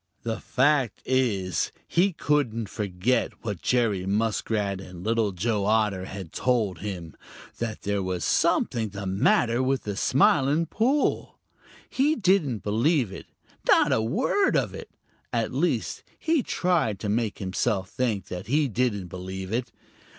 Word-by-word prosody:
The 115 Hz, -1 st, -2 dB
fact 135 Hz, -4 st, +1 dB
is 110 Hz, -9 st, 0 dB, 0.2 s
he 185 Hz, +4 st, +3 dB
couldn't 135 Hz, -, 0 dB
forget 105 Hz, +5 st, -1 dB
what 100 Hz, -6 st, -3 dB
Jerry 110 Hz, -7 st, +1 dB
Muskrat 105 Hz, -1 st, 0 dB
and 90 Hz, -2 st, -10 dB
Little 110 Hz, -1 st, +1 dB
Joe 100 Hz, +2 st, -1 dB
Otter 105 Hz, -3 st, +1 dB
had 95 Hz, -4 st, -8 dB
told 110 Hz, -9 st, 0 dB
him 90 Hz, -5 st, -6 dB, 0.4 s
that 115 Hz, -2 st, -4 dB
there 100 Hz, -1 st, 0 dB
was 95 Hz, -2 st, -2 dB
something 110 Hz, -2 st, +1 dB
the 100 Hz, 0 st, -6 dB
matter 115 Hz, +5 st, +2 dB
with 130 Hz, +1 st, 0 dB
the 105 Hz, -1 st, -4 dB
Smiling 140 Hz, +6 st, +3 dB
Pool. 255 Hz, -, 0 dB, 0.5 s
He 290 Hz, +4 st, +2 dB
didn't 180 Hz, -, +1 dB
believe 120 Hz, -, +1 dB
it, -, -, -9 dB, 0.4 s
not -, -, +5 dB
a 110 Hz, -, +3 dB
word 255 Hz, -, +1 dB
of -, -, -1 dB
it. -, -, -8 dB, 0.4 s
At -, -, -1 dB
least -, -, -1 dB
he 325 Hz, -3 st, +1 dB
tried 175 Hz, -, 0 dB
to 105 Hz, -, -3 dB
make 110 Hz, 0 st, 0 dB
himself 95 Hz, 0 st, -1 dB
think 110 Hz, -7 st, -1 dB
that 90 Hz, +2 st, -7 dB
he 145 Hz, +4 st, +2 dB
didn't 115 Hz, -5 st, 0 dB
believe 95 Hz, +2 st, -6 dB
it. 120 Hz, 0 st, -2 dB
110 Hz, 145 wpm, -26 LUFS, 95-130 Hz, 0.5 s, not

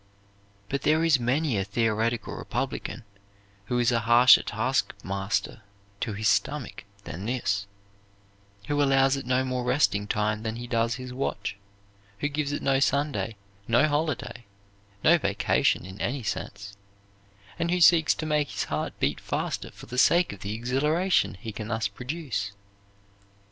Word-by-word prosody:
But 140 Hz, +4 st, -2 dB
there 155 Hz, +2 st, +3 dB
is 160 Hz, -5 st, +4 dB
many 125 Hz, -1 st, +1 dB
a -, -, 0 dB
theoretical 115 Hz, +3 st, -1 dB
republican 115 Hz, +4 st, -4 dB, 0.6 s
who 120 Hz, +4 st, -1 dB
is 120 Hz, 0 st, +3 dB
a 120 Hz, -, +2 dB
harsher 120 Hz, +3 st, +7 dB
taskmaster 95 Hz, +3 st, -2 dB, 0.4 s
to 110 Hz, -, -2 dB
his 105 Hz, +1 st, -1 dB
stomach 145 Hz, -4 st, 0 dB, 0.2 s
than 95 Hz, +2 st, -6 dB
this; 100 Hz, -5 st, -1 dB, 1.0 s
who 145 Hz, +3 st, 0 dB
allows 135 Hz, -1 st, +4 dB
it 135 Hz, -2 st, -6 dB
no 130 Hz, +1 st, +2 dB
more 130 Hz, -1 st, -2 dB
resting 125 Hz, -5 st, +1 dB
time 105 Hz, +1 st, 0 dB
than 110 Hz, 0 st, -3 dB
he 120 Hz, +1 st, -6 dB
does 115 Hz, -1 st, 0 dB
his 125 Hz, -1 st, -7 dB
watch; 125 Hz, -5 st, -3 dB, 0.6 s
who 145 Hz, -, -1 dB
gives 145 Hz, -1 st, -2 dB
it 145 Hz, -, -3 dB
no 135 Hz, -1 st, +3 dB
Sunday, 135 Hz, -7 st, 0 dB, 0.3 s
no 120 Hz, +6 st, +4 dB
holiday, 145 Hz, -5 st, -2 dB, 0.6 s
no 170 Hz, +2 st, +6 dB
vacation 100 Hz, -, +1 dB
in 95 Hz, +2 st, -9 dB
any 130 Hz, +1 st, -2 dB
sense, 100 Hz, -1 st, -5 dB, 0.8 s
and 170 Hz, -, 0 dB
who 180 Hz, +1 st, +1 dB
seeks 165 Hz, -2 st, +6 dB
to 155 Hz, -, -4 dB
make 150 Hz, -1 st, +1 dB
his -, -, -2 dB
heart -, -, -4 dB
beat -, -, 0 dB
faster -, -, -3 dB
for -, -, -13 dB
the 125 Hz, -, -3 dB
sake 170 Hz, -, +4 dB
of 100 Hz, -, -11 dB
the 100 Hz, +3 st, -4 dB
exhilaration 150 Hz, -, +1 dB
he 110 Hz, +4 st, -7 dB
can 105 Hz, +1 st, -6 dB
thus 110 Hz, -2 st, -1 dB
produce. 125 Hz, -3 st, -4 dB
125 Hz, 155 wpm, -27 LUFS, 110-145 Hz, 1.0 s, harsher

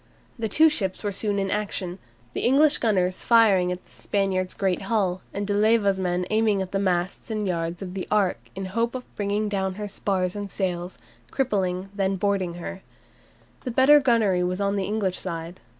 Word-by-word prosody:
The 220 Hz, -1 st, -1 dB
two 315 Hz, +10 st, +6 dB
ships 195 Hz, -12 st, -2 dB
were 205 Hz, -, -1 dB
soon 200 Hz, +1 st, 0 dB
in 195 Hz, -1 st, -1 dB
action, 195 Hz, -3 st, -2 dB, 0.3 s
the -, -, -2 dB
English 285 Hz, +4 st, +4 dB
gunners 185 Hz, -5 st, +1 dB
firing 205 Hz, -6 st, +4 dB
at 180 Hz, 0 st, -6 dB
the -, -, -22 dB
Spaniard's 190 Hz, -2 st, -1 dB
great 190 Hz, -3 st, 0 dB
hull, 190 Hz, -5 st, +1 dB
and 200 Hz, +1 st, -3 dB
De 205 Hz, -, -1 dB
Leyva's 205 Hz, -2 st, +3 dB
men 180 Hz, -1 st, 0 dB
aiming 215 Hz, -2 st, +2 dB
at 190 Hz, -1 st, -3 dB
the 195 Hz, -, 0 dB
masts 185 Hz, +2 st, -1 dB
and 215 Hz, -2 st, -2 dB
yards 170 Hz, +1 st, -2 dB
of 180 Hz, -1 st, -7 dB
the 190 Hz, -1 st, -4 dB
"Ark" 205 Hz, -3 st, +2 dB, 0.2 s
in 195 Hz, -, -4 dB
the 185 Hz, -, -5 dB
hope 230 Hz, +5 st, -1 dB
of 255 Hz, -, -8 dB
bringing 205 Hz, +1 st, -1 dB
down 190 Hz, -2 st, -1 dB
her 210 Hz, +1 st, -5 dB
spars 190 Hz, -2 st, -1 dB
and 205 Hz, -1 st, -5 dB
sails, 180 Hz, -2 st, -3 dB, 0.3 s
crippling 190 Hz, -9 st, 0 dB
and 195 Hz, -, -12 dB
then 195 Hz, -1 st, 0 dB
boarding 190 Hz, -3 st, 0 dB
her. 190 Hz, +2 st, -7 dB, 0.8 s
The 255 Hz, -, -3 dB
better 265 Hz, +5 st, +6 dB
gunnery 225 Hz, -9 st, +2 dB
was 180 Hz, +1 st, -1 dB
on 200 Hz, 0 st, 0 dB
the 195 Hz, -1 st, -1 dB
English 200 Hz, -2 st, -1 dB
side. 170 Hz, 0 st, -5 dB
195 Hz, 200 wpm, -25 LUFS, 185-210 Hz, 0.8 s, two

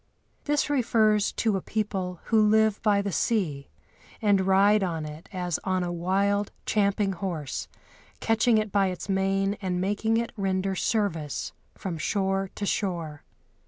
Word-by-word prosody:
This 295 Hz, -1 st, +1 dB
refers 220 Hz, -7 st, +2 dB
to 215 Hz, -4 st, +1 dB
a -, -, -4 dB
people 190 Hz, -5 st, -3 dB
who 220 Hz, -2 st, +3 dB
live 215 Hz, 0 st, +3 dB
by 205 Hz, -2 st, +2 dB
the 200 Hz, -, -2 dB
sea, 155 Hz, -7 st, -1 dB, 0.5 s
and 200 Hz, -3 st, +2 dB
ride 200 Hz, +2 st, +5 dB
on 165 Hz, -4 st, -2 dB
it 150 Hz, +2 st, -9 dB
as 180 Hz, -3 st, -2 dB
on 185 Hz, -1 st, 0 dB
a 175 Hz, -, -2 dB
wild, 195 Hz, +4 st, 0 dB
champing 200 Hz, -1 st, +1 dB
horse, 170 Hz, -6 st, -4 dB, 0.5 s
catching 225 Hz, 0 st, +3 dB
it 215 Hz, -1 st, -1 dB
by 195 Hz, -1 st, +3 dB
its 180 Hz, +1 st, -5 dB
mane 195 Hz, +1 st, +1 dB
and 180 Hz, -2 st, -1 dB
making 205 Hz, +4 st, +1 dB
it 235 Hz, 0 st, -1 dB
render 195 Hz, -2 st, -1 dB
service 185 Hz, -, -1 dB, 0.2 s
from 175 Hz, -4 st, -5 dB
shore 195 Hz, +1 st, 0 dB
to 205 Hz, -, -3 dB
shore. 170 Hz, -8 st, -2 dB
195 Hz, 150 wpm, -26 LUFS, 185-210 Hz, 0.5 s, ride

